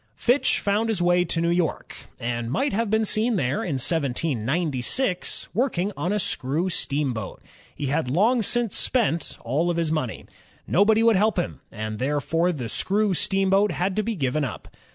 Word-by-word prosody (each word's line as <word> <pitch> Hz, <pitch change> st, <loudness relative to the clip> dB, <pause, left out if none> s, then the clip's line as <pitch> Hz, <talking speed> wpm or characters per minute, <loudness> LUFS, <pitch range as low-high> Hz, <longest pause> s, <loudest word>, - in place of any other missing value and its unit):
Fitch 250 Hz, +4 st, +2 dB
found 210 Hz, +3 st, 0 dB
his 215 Hz, -5 st, 0 dB
way 175 Hz, 0 st, +3 dB
to 165 Hz, -, -2 dB
New 170 Hz, 0 st, +1 dB
York, 175 Hz, -3 st, -1 dB, 0.2 s
and 120 Hz, 0 st, -3 dB
might 195 Hz, -, 0 dB
have 225 Hz, +1 st, 0 dB
been 220 Hz, +1 st, +2 dB
seen 220 Hz, +3 st, +2 dB
there 135 Hz, -5 st, 0 dB
in 155 Hz, -, -2 dB
1796, 150 Hz, -, -1 dB
working 205 Hz, -4 st, 0 dB
on 180 Hz, -, -2 dB
a 210 Hz, -, +1 dB
screw 165 Hz, 0 st, -1 dB
steamboat. 135 Hz, -, -2 dB, 0.4 s
He 145 Hz, -, -4 dB
had 140 Hz, -1 st, 0 dB
long 220 Hz, -, +3 dB
since 235 Hz, 0 st, 0 dB
spent 205 Hz, -10 st, 0 dB
all 155 Hz, +9 st, 0 dB
his 165 Hz, -2 st, -1 dB
own -, -, +1 dB
money. 130 Hz, -8 st, -3 dB, 0.4 s
Nobody 215 Hz, +4 st, +3 dB
would 230 Hz, -3 st, +5 dB
help 215 Hz, +1 st, +2 dB
him, 175 Hz, -, -2 dB
and 110 Hz, -1 st, -5 dB
therefore 150 Hz, +6 st, +1 dB
the 130 Hz, -8 st, -4 dB
screw 200 Hz, -, +1 dB
steamboat 195 Hz, +3 st, +2 dB
had 185 Hz, +2 st, -1 dB
to 215 Hz, -, +2 dB
be 225 Hz, +1 st, -2 dB
given 145 Hz, -2 st, 0 dB
up. 135 Hz, -, -6 dB
175 Hz, 175 wpm, -24 LUFS, 140-210 Hz, 0.4 s, would